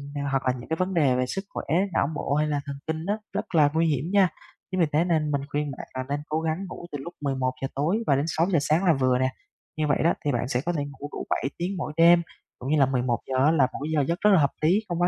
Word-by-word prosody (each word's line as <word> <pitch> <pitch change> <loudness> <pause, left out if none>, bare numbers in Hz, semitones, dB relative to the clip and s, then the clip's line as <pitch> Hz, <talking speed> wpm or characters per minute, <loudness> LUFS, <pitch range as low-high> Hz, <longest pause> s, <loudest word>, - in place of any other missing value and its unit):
thì 145 - -2
hoặc 135 -1 +1
là 130 - +2
những 120 - -11
cái 160 - +1
vấn 185 +2 -1
đề 145 -7 +3
về 125 0 +1
sức 195 +10 -4
khỏe, - - -6 0.3
não 140 - +2
bộ 140 - -2
hay 150 +1 +2
là 145 -1 -1
thần 140 - -5
kinh 160 +1 -3
á, 205 +2 +1 0.2
rất 190 - -3
là 150 -3 +6
nguy 165 +1 +2
hiểm 145 -2 0
nha. 200 -2 +5 0.4
Chính 185 - -1
vì 170 - +5
thế 155 +3 +4
nên 160 -4 +1
mình 140 -1 0
khuyên 145 0 -1
bạn - - -8
là 130 - -2
nên 145 +1 -1
cố 155 +1 0
gắng 160 +4 -2
ngủ 175 - -8
từ 145 - -3
lúc 170 +6 -8
11:00 130 -2 -1
tối 155 +9 +1
và 140 - +4
đến 140 +2 0
6:00 170 +2 +1
sáng 155 +6 +1
là 170 - +5
vừa 130 -1 +3
nè, 130 0 +2 0.5
như 155 -1 0
vậy 145 - +2
đó 170 - +4
thì 145 - +2
bạn 120 -1 -1
sẽ 125 -1 0
có 175 - 0
thể 150 -4 -1
ngủ 145 0 -8
đủ - - -5
7 - - 0
tiếng 185 +3 -3
mỗi 150 -3 -4
đêm, 170 +1 +7 0.4
cũng 130 - -5
như 155 - +3
là 135 - +6
11:00 130 0 -1
á 155 - +5
là 145 -6 +4
một - - -5
cái 155 - -3
giờ 150 - +3
giấc 170 +3 -1
rất 210 - +5
là 190 - +6
hợp 140 -2 +3
lý, 165 +5 +4
không 175 0 -2
quá 175 - +4
150 Hz, 300 wpm, -26 LUFS, 135-170 Hz, 0.5 s, đêm